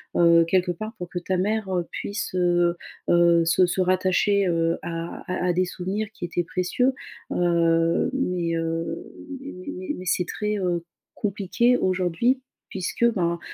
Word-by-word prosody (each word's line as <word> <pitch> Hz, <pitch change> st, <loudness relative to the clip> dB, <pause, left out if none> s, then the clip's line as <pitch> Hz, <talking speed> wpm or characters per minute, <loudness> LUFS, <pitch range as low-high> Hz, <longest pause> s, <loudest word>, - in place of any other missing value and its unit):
heu, 170 Hz, -1 st, +6 dB
quelque 180 Hz, +1 st, +2 dB
part 215 Hz, +6 st, -6 dB
pour 180 Hz, -2 st, -6 dB
que 175 Hz, -, -3 dB
ta 185 Hz, +2 st, -2 dB
mère, 210 Hz, +3 st, 0 dB
heu, 175 Hz, -1 st, 0 dB
puisse, 200 Hz, -2 st, -4 dB
heu 175 Hz, -1 st, +2 dB, 0.3 s
heu, 170 Hz, -1 st, +5 dB
se 165 Hz, +3 st, +4 dB
se 180 Hz, +1 st, 0 dB
rattacher, 185 Hz, +2 st, +2 dB
heu, 165 Hz, -1 st, +1 dB
à, 165 Hz, +2 st, -6 dB
à 180 Hz, 0 st, -1 dB
à 180 Hz, -, +3 dB
des 185 Hz, +1 st, +2 dB
souvenirs 190 Hz, +4 st, -3 dB
qui -, -, -10 dB
étaient 175 Hz, 0 st, -1 dB
précieux. 190 Hz, +10 st, +1 dB, 0.4 s
Heu, 170 Hz, +2 st, +2 dB
mais, 180 Hz, -10 st, -1 dB
heu, 165 Hz, 0 st, -2 dB, 0.5 s
mais 270 Hz, -10 st, -8 dB
mais 185 Hz, +1 st, -6 dB
mais 185 Hz, -, -8 dB
c'est 180 Hz, 0 st, +1 dB
très, 210 Hz, 0 st, -2 dB
heu, 175 Hz, -2 st, -1 dB, 0.3 s
compliqué 210 Hz, +5 st, +1 dB
aujourd'hui, 185 Hz, +8 st, +1 dB, 0.3 s
puisque 190 Hz, +5 st, -1 dB
ben, 170 Hz, -4 st, 0 dB
180 Hz, 160 wpm, -24 LUFS, 170-195 Hz, 0.5 s, heu